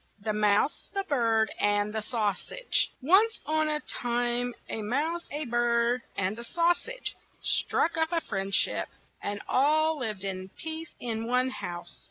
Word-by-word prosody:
THE 215 Hz, +1 st, -2 dB
MOUSE, 210 Hz, +5 st, +2 dB
THE 395 Hz, -, 0 dB
BIRD, 230 Hz, -, +2 dB
AND 205 Hz, 0 st, +2 dB
THE 220 Hz, -, -1 dB
SAUSAGE 220 Hz, -, 0 dB
ONCE 405 Hz, -, +5 dB
on 310 Hz, 0 st, +2 dB
a 300 Hz, 0 st, 0 dB
time 245 Hz, -1 st, -1 dB
a 220 Hz, -, -3 dB
mouse, 300 Hz, +10 st, -1 dB
a 295 Hz, +1 st, -3 dB
bird, 240 Hz, 0 st, +2 dB, 0.2 s
and 200 Hz, +3 st, 0 dB
a -, -, -5 dB
sau 340 Hz, +7 st, +3 dB
sage -, -, -5 dB, 0.3 s
struck 335 Hz, -, +1 dB
up 320 Hz, +1 st, +1 dB
a 340 Hz, -, +2 dB
friend 195 Hz, -6 st, -3 dB
ship, -, -, +2 dB, 0.3 s
and 205 Hz, 0 st, -3 dB
all 310 Hz, +3 st, +3 dB
lived 215 Hz, -6 st, -3 dB
in 190 Hz, -1 st, -4 dB
peace 320 Hz, +1 st, -5 dB
in 225 Hz, -1 st, -2 dB
one 250 Hz, +1 st, +2 dB
house. 175 Hz, -7 st, -6 dB
240 Hz, 160 wpm, -29 LUFS, 210-310 Hz, 0.3 s, ONCE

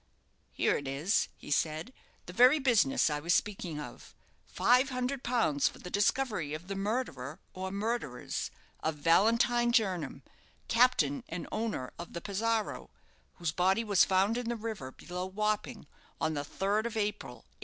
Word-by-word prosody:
"Here -, -, +1 dB
it 140 Hz, -, -6 dB
is," 145 Hz, +9 st, +1 dB
he -, -, -10 dB
said; 155 Hz, -, 0 dB, 0.3 s
"the 180 Hz, -, -9 dB
very 250 Hz, +8 st, +7 dB
business 270 Hz, -1 st, +3 dB
I 150 Hz, -1 st, 0 dB
was 170 Hz, +4 st, +2 dB
speaking 185 Hz, -7 st, -2 dB
of. 150 Hz, -, -10 dB, 0.3 s
Five 250 Hz, +2 st, +3 dB
hundred 255 Hz, +1 st, -2 dB
pounds 225 Hz, -, +2 dB
for -, -, -5 dB
the 180 Hz, -, -9 dB
discovery 205 Hz, -, +1 dB
of 165 Hz, +3 st, -9 dB
the 195 Hz, -, -4 dB
murderer, 195 Hz, -, -3 dB
or 190 Hz, 0 st, -4 dB
murderers, 200 Hz, -, -3 dB, 0.3 s
of 160 Hz, 0 st, -1 dB
Valentine 230 Hz, +9 st, +3 dB
Jernam, 185 Hz, -, 0 dB, 0.4 s
captain 230 Hz, -, +3 dB
and 170 Hz, +1 st, -5 dB
owner 215 Hz, -, -2 dB
of 170 Hz, -, -8 dB
the 170 Hz, -, -3 dB
'Pizarro', 220 Hz, +3 st, -1 dB, 0.5 s
whose 170 Hz, -3 st, -2 dB
body 190 Hz, +6 st, +2 dB
was 205 Hz, -4 st, +4 dB
found 195 Hz, +5 st, +2 dB
in 240 Hz, -1 st, -4 dB
the 235 Hz, -, -1 dB
river, 215 Hz, -, -5 dB
below 180 Hz, +6 st, -6 dB
Wapping, 210 Hz, +2 st, -2 dB, 0.3 s
on 160 Hz, 0 st, 0 dB
the 145 Hz, -1 st, -2 dB
third 200 Hz, +8 st, 0 dB
of 230 Hz, -1 st, -5 dB
April, 210 Hz, -1 st, -2 dB, 0.2 s
1836. -, -, -39 dB
200 Hz, 160 wpm, -31 LUFS, 160-230 Hz, 0.5 s, very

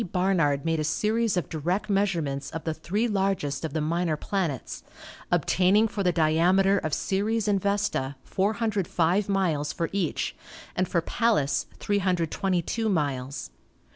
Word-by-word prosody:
Barnard 165 Hz, -7 st, +1 dB
made 165 Hz, -1 st, +1 dB
a -, -, 0 dB
series 215 Hz, +6 st, +1 dB
of 180 Hz, -, -1 dB
direct 175 Hz, +6 st, -2 dB
measurements 175 Hz, -9 st, 0 dB
of 160 Hz, -, -6 dB
the 160 Hz, -, -1 dB
three 205 Hz, +9 st, -1 dB
largest 190 Hz, -9 st, -1 dB
of 160 Hz, -3 st, -3 dB
the 155 Hz, -, 0 dB
minor 165 Hz, 0 st, 0 dB
planets, 170 Hz, -8 st, -3 dB, 0.5 s
obtaining 195 Hz, +5 st, +3 dB
for 205 Hz, -1 st, -4 dB
the 180 Hz, -2 st, +3 dB
diameter 175 Hz, +5 st, +3 dB
of 155 Hz, -, -3 dB
Ceres 210 Hz, +6 st, 0 dB
and 200 Hz, -2 st, +2 dB
Vesta 200 Hz, -9 st, 0 dB
405 200 Hz, -3 st, 0 dB
miles 170 Hz, -7 st, +1 dB
for 165 Hz, -2 st, -2 dB
each, 195 Hz, -5 st, -1 dB, 0.4 s
and 185 Hz, 0 st, +1 dB
for 170 Hz, -1 st, +1 dB
Pallas 150 Hz, -, +1 dB
322 190 Hz, +2 st, 0 dB
miles. 140 Hz, -6 st, -2 dB
180 Hz, 140 wpm, -26 LUFS, 155-200 Hz, 0.5 s, obtaining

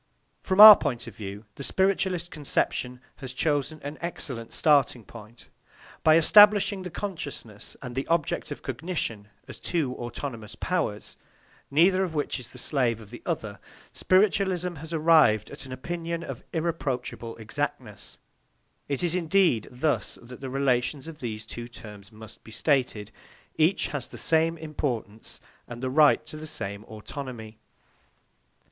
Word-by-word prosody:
From 190 Hz, 0 st, -1 dB
our 215 Hz, 0 st, +14 dB
point 125 Hz, -9 st, -3 dB
of -, -, -10 dB
view, 100 Hz, +1 st, -8 dB
the 140 Hz, -, -8 dB
spiritualist 185 Hz, +2 st, 0 dB
conception 125 Hz, -4 st, -2 dB, 0.2 s
has 130 Hz, -3 st, -7 dB
chosen 145 Hz, +2 st, -1 dB
an 145 Hz, +2 st, -7 dB
excellent 135 Hz, -9 st, -4 dB
starting 140 Hz, -6 st, +2 dB
point. 115 Hz, +1 st, -13 dB, 0.6 s
By 155 Hz, 0 st, +6 dB
establishing 205 Hz, +3 st, +6 dB
the 180 Hz, -, -6 dB
consciousness 150 Hz, -, -7 dB
and 125 Hz, -2 st, -6 dB
the 135 Hz, +2 st, -3 dB
object 165 Hz, -3 st, 0 dB
of -, -, -7 dB
cognition 130 Hz, -, -4 dB, 0.2 s
as -, -, -10 dB
two 155 Hz, -7 st, -1 dB
autonomous 120 Hz, -3 st, -6 dB
powers, 175 Hz, -, -3 dB, 0.5 s
neither 180 Hz, +6 st, +4 dB
of 170 Hz, -4 st, -4 dB
which 145 Hz, -2 st, -2 dB
is 125 Hz, -, -9 dB
the -, -, -13 dB
slave 125 Hz, -4 st, 0 dB
of 110 Hz, -1 st, -14 dB
the 120 Hz, -, -10 dB
other, 110 Hz, -, -3 dB, 0.3 s
spiritualism 185 Hz, -2 st, +2 dB
has 160 Hz, +3 st, -9 dB
arrived 155 Hz, -10 st, +4 dB
at -, -, -8 dB
an -, -, -11 dB
opinion 170 Hz, +5 st, -4 dB
of -, -, -7 dB
irreproachable 135 Hz, -8 st, -3 dB
exactness; 110 Hz, -1 st, -5 dB, 0.7 s
it 140 Hz, +3 st, -2 dB
is 175 Hz, -1 st, +2 dB
indeed 175 Hz, -, +2 dB
thus 140 Hz, +5 st, -1 dB
that 125 Hz, +2 st, -12 dB
the 135 Hz, -, -5 dB
relations 135 Hz, +1 st, 0 dB
of 160 Hz, -2 st, -9 dB
these 110 Hz, -4 st, -5 dB
two 120 Hz, +1 st, -7 dB
terms 105 Hz, -4 st, -12 dB
must 110 Hz, 0 st, -13 dB
be -, -, -14 dB
stated; 115 Hz, -4 st, 0 dB, 0.4 s
each 160 Hz, +5 st, +2 dB
has 140 Hz, -5 st, -4 dB
the -, -, -10 dB
same 165 Hz, +1 st, +2 dB
importance 130 Hz, -9 st, -5 dB, 0.3 s
and 120 Hz, +1 st, -9 dB
the 130 Hz, -, -1 dB
right 150 Hz, +1 st, +5 dB
to 155 Hz, -, -7 dB
the 155 Hz, +1 st, -7 dB
same 100 Hz, -7 st, -2 dB
autonomy. 110 Hz, -1 st, -8 dB
140 Hz, 150 wpm, -26 LUFS, 120-165 Hz, 0.7 s, our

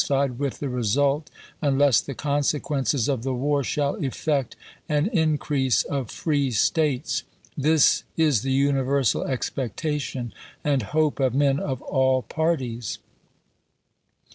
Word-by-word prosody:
fied 135 Hz, -3 st, 0 dB
with 140 Hz, -2 st, -2 dB
the 145 Hz, -, -4 dB
result, 135 Hz, +5 st, 0 dB, 0.3 s
unless 140 Hz, -2 st, +4 dB
the 140 Hz, -, -7 dB
consequences 145 Hz, -2 st, 0 dB
of 135 Hz, -5 st, 0 dB
the 135 Hz, -, -3 dB
chap, -, -, 0 dB
xii, -, -, -3 dB
war 145 Hz, +1 st, +1 dB
shall 140 Hz, +2 st, -1 dB
effect 140 Hz, 0 st, -1 dB, 0.3 s
an 150 Hz, 0 st, +2 dB
increase 150 Hz, -, +1 dB
of 135 Hz, -6 st, -3 dB
free 145 Hz, -4 st, 0 dB
States. 140 Hz, +4 st, +1 dB, 0.3 s
This 155 Hz, +1 st, +3 dB
is 150 Hz, -9 st, +3 dB
the 135 Hz, -, -2 dB
universal 135 Hz, -2 st, +2 dB
expectation 130 Hz, 0 st, -3 dB, 0.3 s
and 140 Hz, -3 st, +1 dB
hope 150 Hz, +7 st, 0 dB
of 130 Hz, -2 st, +1 dB
men 140 Hz, 0 st, +3 dB
of 135 Hz, -3 st, -4 dB
all 130 Hz, -2 st, +2 dB
parties." 130 Hz, -, -2 dB
140 Hz, 130 wpm, -24 LUFS, 130-150 Hz, 0.3 s, unless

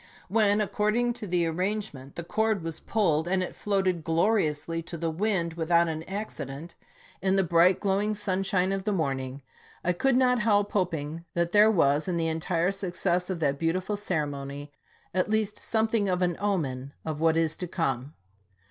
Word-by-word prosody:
When, 210 Hz, 0 st, +3 dB
according 215 Hz, +4 st, +1 dB
to 215 Hz, -3 st, -7 dB
the 175 Hz, -1 st, +1 dB
arrangement, 175 Hz, -5 st, -3 dB
the 170 Hz, -, -4 dB
cord 220 Hz, +1 st, 0 dB
was 165 Hz, -1 st, -5 dB
pulled, 170 Hz, -7 st, +1 dB
and 185 Hz, 0 st, +1 dB
it -, -, -5 dB
floated 190 Hz, -4 st, 0 dB
glori 170 Hz, +3 st, +2 dB
ously 160 Hz, +3 st, -4 dB
to 170 Hz, +1 st, -7 dB
the 165 Hz, 0 st, -1 dB
wind, 175 Hz, -2 st, 0 dB
without 170 Hz, +1 st, +2 dB
an 160 Hz, -1 st, -3 dB
accident, 165 Hz, -7 st, -5 dB, 0.5 s
in 190 Hz, 0 st, +2 dB
the 195 Hz, -, +3 dB
bright, 175 Hz, +2 st, +4 dB
glowing 205 Hz, +2 st, 0 dB
sunshine 195 Hz, -2 st, 0 dB
of 195 Hz, 0 st, -2 dB
the 210 Hz, -, 0 dB
morning, 135 Hz, -6 st, -2 dB, 0.4 s
I 180 Hz, -, +2 dB
could 265 Hz, +8 st, +2 dB
not 250 Hz, -1 st, +3 dB
help 205 Hz, -2 st, +2 dB
hop 180 Hz, -4 st, +1 dB
ing 155 Hz, +3 st, -6 dB
that 170 Hz, 0 st, +1 dB
there 210 Hz, +2 st, +6 dB
was, 150 Hz, -6 st, +2 dB
in 180 Hz, -2 st, 0 dB
the 165 Hz, -1 st, 0 dB
entire 165 Hz, +2 st, 0 dB
success 180 Hz, -2 st, -1 dB
of 185 Hz, -3 st, -2 dB
that 140 Hz, -2 st, +1 dB
beautiful 180 Hz, +5 st, 0 dB
ceremony, 145 Hz, -7 st, -3 dB, 0.4 s
at 185 Hz, +2 st, +1 dB
least 215 Hz, -1 st, 0 dB
something 220 Hz, -2 st, +1 dB
of 180 Hz, 0 st, +1 dB
an 175 Hz, -1 st, +1 dB
omen 140 Hz, -10 st, -2 dB
of 155 Hz, -2 st, -3 dB
what 160 Hz, 0 st, +3 dB
is 160 Hz, -1 st, +1 dB
to 180 Hz, -, -4 dB
come. 140 Hz, -5 st, -2 dB
180 Hz, 180 wpm, -27 LUFS, 160-205 Hz, 0.5 s, there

